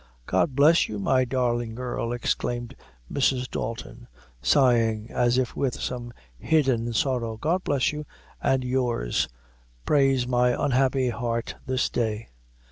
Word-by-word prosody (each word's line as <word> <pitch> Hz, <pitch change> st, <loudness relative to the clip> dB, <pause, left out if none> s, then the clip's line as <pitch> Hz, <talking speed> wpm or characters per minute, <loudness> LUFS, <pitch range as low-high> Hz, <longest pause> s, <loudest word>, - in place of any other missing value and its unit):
"God 110 Hz, -, +1 dB
bless 150 Hz, +4 st, +5 dB
you, 105 Hz, -, -4 dB
my 130 Hz, +6 st, +2 dB
darlin' 120 Hz, -2 st, -1 dB
girl!" 120 Hz, -1 st, -3 dB
exclaimed 120 Hz, 0 st, -2 dB, 0.4 s
Mrs. 130 Hz, -2 st, +1 dB
Dalton, 110 Hz, 0 st, -6 dB, 0.3 s
sighing, 115 Hz, -5 st, +3 dB
as 120 Hz, 0 st, +2 dB
if 130 Hz, -2 st, -1 dB
with 135 Hz, -3 st, -1 dB
some 120 Hz, -1 st, -4 dB, 0.3 s
hidden 130 Hz, -, +1 dB
sorrow; 115 Hz, -1 st, -1 dB
"God 170 Hz, +9 st, 0 dB
bless 140 Hz, 0 st, +1 dB
you 150 Hz, 0 st, -6 dB, 0.3 s
and 130 Hz, -1 st, +1 dB
yours, 125 Hz, -, 0 dB, 0.6 s
prays 135 Hz, -3 st, +3 dB
my 125 Hz, 0 st, +2 dB
unhappy 130 Hz, -1 st, +2 dB
heart 115 Hz, -1 st, -2 dB
this 130 Hz, -1 st, +1 dB
day!" 110 Hz, -2 st, -2 dB
125 Hz, 125 wpm, -25 LUFS, 115-130 Hz, 0.6 s, bless